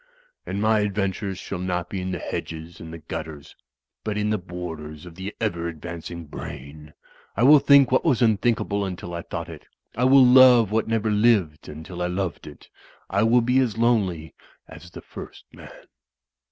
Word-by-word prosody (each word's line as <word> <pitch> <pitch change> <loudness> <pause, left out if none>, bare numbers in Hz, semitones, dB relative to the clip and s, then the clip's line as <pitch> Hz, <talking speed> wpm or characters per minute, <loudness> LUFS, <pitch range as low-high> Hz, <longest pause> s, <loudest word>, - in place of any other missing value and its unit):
And 100 - -3
my 110 +1 +3
adventures 100 -1 -2
shall 95 -1 -6
not 90 -1 -2
be 95 0 -5
in 90 - -4
the 90 - -3
hedges 80 +1 -6
and 80 - -9
the 85 - -7
gutters, 75 -2 -8 0.5
but 105 -1 -3
in 105 0 0
the 105 - 0
borders 80 -4 -8
of 90 - -11
the 95 +4 -6
ever 85 -6 -2
advancing 85 +1 -7
brain. 75 +1 -10 0.4
I 115 - +2
will 145 +3 +8
think 140 -2 +5
what 130 - +3
was 140 -8 +2
unthink 115 0 +2
able 100 0 -2
until 90 -2 -6
I 85 - -4
thought - - -6
it; - - -11 0.3
I 125 - +1
will 130 0 +7
love 125 -4 +7
what 110 0 0
never 110 -1 0
lived 105 -8 +1
until 80 +4 -8
I 90 - 0
loved 90 -1 -4
it - - -13 0.2
— - - -31
I 100 - +1
will 115 +2 +4
be 125 +3 +2
as 120 -5 0
lonely 100 -9 0 0.3
as 90 - -13
the - - -11
First - - -11
Man." - - -12
95 Hz, 190 wpm, -24 LUFS, 85-115 Hz, 0.5 s, will